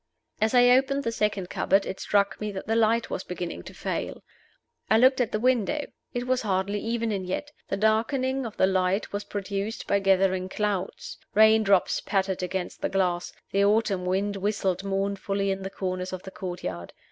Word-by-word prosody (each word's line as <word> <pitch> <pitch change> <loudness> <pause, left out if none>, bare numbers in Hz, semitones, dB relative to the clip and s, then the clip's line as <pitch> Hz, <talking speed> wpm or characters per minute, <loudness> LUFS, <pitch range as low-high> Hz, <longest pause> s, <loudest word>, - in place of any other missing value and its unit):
As 220 +3 +2
I 245 0 +7
opened 270 +2 +3
the 230 - -1
second 205 -5 -1
cupboard 195 +1 +2
it 190 - -5
struck 200 -1 +1
me 210 0 -2
that 190 - -6
the 225 - 0
light 230 0 +2
was - - -3
beginning 180 -1 -5
to - - -9
fail. - - -4 0.7
I 220 - +5
looked 260 +2 +5
at 235 - 0
the 215 - -1
window: 255 +4 +1 0.3
it 245 0 -3
was 255 0 +1
hardly 200 0 0
evening 225 -4 -1
yet. 240 +11 -4 0.2
The 195 - -2
darkening 255 +5 +1
of 215 - -11
the - - +5
light 190 +2 0
was 205 0 -2
produced 200 +2 -4
by 200 - +2
gathering 190 -1 +2
clouds. 200 -2 -3 0.2
Rain 220 +1 +6
drops 195 -3 +2
pattered 190 -2 -1
against 180 0 -4
the - - 0
glass; 180 -2 0 0.2
the 200 0 +3
autumn 200 -3 +2
wind 200 +2 0
whistled 195 -2 -1
mournfully 195 0 -1
in 195 0 -3
the 190 - -4
corners 185 -1 -3
of 185 - -6
the 190 - -8
courtyard. 135 - -6
200 Hz, 185 wpm, -26 LUFS, 190-220 Hz, 0.7 s, I